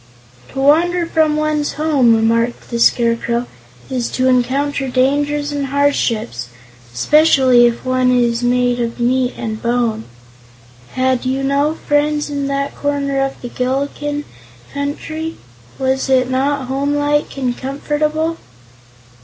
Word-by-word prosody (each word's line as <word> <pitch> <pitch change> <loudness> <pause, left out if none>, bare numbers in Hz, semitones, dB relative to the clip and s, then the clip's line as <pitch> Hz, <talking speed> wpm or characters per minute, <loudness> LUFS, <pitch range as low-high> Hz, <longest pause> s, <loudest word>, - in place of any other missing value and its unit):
"To - - -7
wander 335 +5 +3
from 315 -2 +1
one's 305 -1 -1
home," 280 -7 +3
remarked 230 +2 0
the 235 - -2
Scarecrow, 235 0 +2 0.4
"is 250 -2 -2
to 255 - 0
encounter 270 +2 +1
dangers 290 +3 0
and 285 -1 -2
hardships, 235 - 0 0.4
especially 260 - +4
if 235 +1 -3
one 255 0 +2
is 240 -1 +2
made 245 0 +1
of 235 0 -3
meat 250 +1 +1
and 220 -2 -5
bone. 235 -2 -1 0.9
Had 260 -1 +1
you 265 +1 -1
no 280 +3 +1
friends 295 0 0
in 280 -1 -2
that 280 0 -2
corner 280 -1 -1
of 270 0 -4
the 245 - -5
Gillikin 280 +4 -2 0.5
Country? 310 +3 -4 0.4
Was 265 0 -1
it 260 -1 +2
not 275 +1 0
homelike 290 +2 -1
and 250 -3 -1
comfortable?" 300 +4 -2
270 Hz, 125 wpm, -17 LUFS, 245-290 Hz, 0.9 s, especially